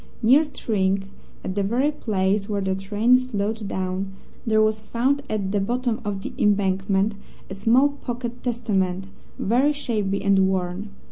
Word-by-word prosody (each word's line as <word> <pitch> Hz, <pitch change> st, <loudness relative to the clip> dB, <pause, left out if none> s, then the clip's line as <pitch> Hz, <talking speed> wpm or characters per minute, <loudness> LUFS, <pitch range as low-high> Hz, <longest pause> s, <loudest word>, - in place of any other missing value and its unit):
Near 270 Hz, +8 st, +6 dB
Tring, 195 Hz, -8 st, -1 dB, 0.3 s
at 185 Hz, -, -3 dB
the 200 Hz, -, 0 dB
very 245 Hz, +9 st, +1 dB
place 200 Hz, -6 st, 0 dB
where 205 Hz, -1 st, 0 dB
the 190 Hz, 0 st, 0 dB
train 210 Hz, +6 st, +3 dB
slowed 220 Hz, -3 st, -3 dB
down, 190 Hz, 0 st, -3 dB, 0.3 s
there 220 Hz, -1 st, +3 dB
was 215 Hz, 0 st, +2 dB
found 255 Hz, +6 st, 0 dB
at 200 Hz, -3 st, -1 dB
the 205 Hz, -, +1 dB
bottom 240 Hz, +2 st, -1 dB
of 200 Hz, -2 st, -3 dB
the -, -, -5 dB
embankment 195 Hz, 0 st, +2 dB, 0.4 s
a -, -, -3 dB
small 235 Hz, +8 st, +4 dB
pocket 245 Hz, -3 st, -6 dB
Testament, 195 Hz, -6 st, -1 dB, 0.3 s
very 255 Hz, +8 st, +2 dB
shabby 210 Hz, -8 st, -2 dB
and 195 Hz, -1 st, +4 dB
worn. 190 Hz, +2 st, -2 dB
210 Hz, 150 wpm, -24 LUFS, 195-240 Hz, 0.4 s, Near